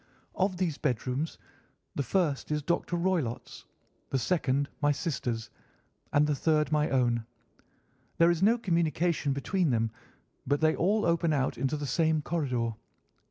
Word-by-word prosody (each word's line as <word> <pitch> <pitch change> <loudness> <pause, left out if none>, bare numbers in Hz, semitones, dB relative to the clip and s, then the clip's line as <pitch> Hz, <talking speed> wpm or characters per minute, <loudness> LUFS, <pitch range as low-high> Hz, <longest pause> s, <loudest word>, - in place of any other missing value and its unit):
Of 190 -1 0
these 175 -5 -1
bedrooms 130 +3 -1 0.6
the - - -1
first 145 +1 0
is 150 -1 0
Dr. 170 +2 -1
Roylott's, 170 -9 -2 0.4
the 135 - 0
second 140 -1 +1
my 145 0 +4
sister's, 120 -7 -3 0.6
and 145 +1 +4
the 150 - +1
third 150 +1 +1
my 150 0 +2
own. 120 -3 +1 0.9
There 170 +1 +5
is 170 0 -1
no 225 +5 +5
communication 170 -6 0
between 165 +5 0
them, 115 -2 +1 0.6
but 145 0 +2
they 155 0 +3
all 210 +5 +2
open 170 -1 +2
out 135 -3 0
into 135 +3 0
the 145 - -4
same 155 +2 +1
corridor. 125 -9 -1
150 Hz, 145 wpm, -29 LUFS, 135-170 Hz, 0.9 s, There